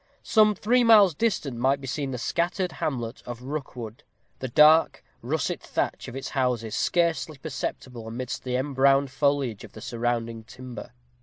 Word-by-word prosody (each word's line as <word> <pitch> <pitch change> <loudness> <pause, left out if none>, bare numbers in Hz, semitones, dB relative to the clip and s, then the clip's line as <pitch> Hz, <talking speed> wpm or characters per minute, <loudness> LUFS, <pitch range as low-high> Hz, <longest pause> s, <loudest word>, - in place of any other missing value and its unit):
Some 215 -2 +4
three 240 +6 +2
miles 210 -6 +7
distant 150 - -1
might 135 +3 +2
be 135 - -9
seen 140 +1 -3
the 130 - -4
scattered 175 - -1
hamlet 120 -4 -4
of 120 0 -7
Rookwood; 125 -5 -6 0.4
the 130 - -3
dark 155 +6 +5 0.2
russet - - -2
thatch - - -3
of 125 - -8
its 135 - -5
houses 125 -5 -1
scarcely 160 -4 0
perceptible 130 -5 -5
amidst 120 +2 -5
the 125 -1 -2
embrowned 135 0 +2
foliage 135 -5 0
of - - -12
the - - -10
surrounding 115 -1 -2
timber. 125 +1 -10
135 Hz, 155 wpm, -26 LUFS, 120-155 Hz, 0.4 s, miles